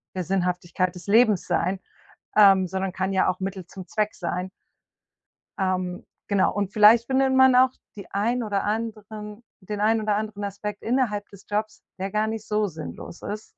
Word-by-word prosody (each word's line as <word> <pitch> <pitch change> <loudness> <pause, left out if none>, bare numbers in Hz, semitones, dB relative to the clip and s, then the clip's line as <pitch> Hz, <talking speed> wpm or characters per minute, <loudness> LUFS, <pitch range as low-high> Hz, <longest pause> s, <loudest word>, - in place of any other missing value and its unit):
der 185 - -2
Sinnhaftigkeit 180 0 -1
des 180 0 -12
Lebens 215 -2 +4
sein, 185 +2 0 0.6
ähm, 195 -3 +6
sondern 190 +1 -2
kann 190 +1 -2
ja 190 - +3
auch 185 - -2
Mittel 190 -1 -4
zum 185 -1 -10
Zweck 215 -1 -1
sein. 180 +1 -3 1.1
Ähm, 185 -2 -1 0.2
genau 200 -2 +2
und 200 -1 -2
vielleicht 220 +2 +6
findet 265 0 +2
man 260 -1 +6
auch 255 +1 +6 0.3
die 200 - -10
ein 230 +5 0
oder 205 -3 -1
anderen 215 0 -4 0.2
den 205 +2 -5
ein 220 +1 +3
oder 210 -1 +1
anderen 210 -1 -4
Aspekt 205 +1 -5
innerhalb 225 -4 0
des 200 -1 -15
Jobs, 210 +1 -3 0.2
der 190 +1 -3
gar 215 +2 +1
nicht 220 -1 -5
so 210 0 +1
sinnlos 165 0 -8
ist, 215 +1 -7
205 Hz, 170 wpm, -25 LUFS, 190-215 Hz, 1.1 s, ähm